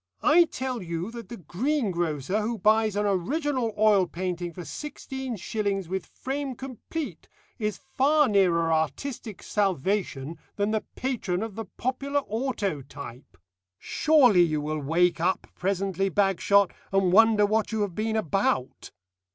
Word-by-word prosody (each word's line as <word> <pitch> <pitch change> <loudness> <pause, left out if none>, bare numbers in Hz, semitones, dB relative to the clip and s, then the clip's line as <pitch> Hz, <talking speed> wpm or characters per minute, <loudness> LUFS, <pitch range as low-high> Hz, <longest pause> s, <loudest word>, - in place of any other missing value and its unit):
I 335 +3 +6
tell 260 -6 -4
you 170 +3 -4
that 235 -1 -9
the 240 - -7
greengrocer 185 - -1
who 225 +2 -2
buys 215 +1 +3
an 205 0 +1
original 245 - 0
oil 205 -3 +4
painting 175 -1 -3
for 175 0 -8
sixteen 265 - -6
shillings 200 -2 -2
with 190 +1 -3
frame 270 0 -4
complete 265 - -6 0.3
is 210 -2 -1
far 280 +2 +2
nearer 175 -6 +3
artistic 210 - -3
salvation 185 -6 -1 0.2
than 205 +1 0
the 220 -1 +1
patron 220 -8 -2
of 225 -2 -5
the 225 +2 -5
popular 275 +3 -1
autotype. 195 - -4 0.4
Surely 265 - +4
you 155 -3 +2
will 155 +1 -2
wake 170 +5 +2
up 180 +3 0
presently, 195 +1 -1
Bagshot, 200 0 +3 0.2
and 195 -2 +3
wonder 220 0 +6
what 215 +2 0
you 220 -1 -1
have 200 -3 -1
been 220 +3 -1
about. 180 -9 -1
205 Hz, 135 wpm, -26 LUFS, 180-240 Hz, 0.4 s, I